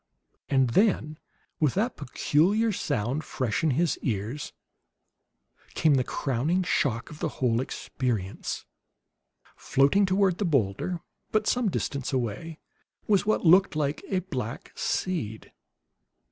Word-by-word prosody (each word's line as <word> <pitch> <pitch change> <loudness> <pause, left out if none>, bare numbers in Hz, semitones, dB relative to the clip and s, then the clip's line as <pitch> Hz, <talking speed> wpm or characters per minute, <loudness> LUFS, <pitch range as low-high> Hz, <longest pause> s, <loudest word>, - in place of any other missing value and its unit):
And 135 -3 +3
then, 160 - +2 0.4
with 150 -5 +2
that 225 +6 0
peculiar 195 - +2
sound 140 - -1
fresh 130 -4 -2
in 160 - +3
his 160 +5 +1
ears, 115 +5 -3 1.2
came 155 -2 +4
the 130 -2 +3
crowning 145 +10 0
shock 130 -6 0
of 150 - -10
the 165 - -1
whole 120 -2 +2
experience. 120 -7 -3 0.9
Floating 165 +9 +3
toward 190 -1 +2
the - - +1
boulder, 145 - 0 0.3
but 215 -1 +2
some 245 -3 +2
distance 140 -6 -2
away, 130 +6 -3 0.5
was 205 -1 +2
what 215 - +1
looked 185 +1 +6
like 150 -1 -1
a 185 -1 +1
black 130 - -5
seed. 135 - -2
150 Hz, 120 wpm, -27 LUFS, 125-185 Hz, 1.2 s, looked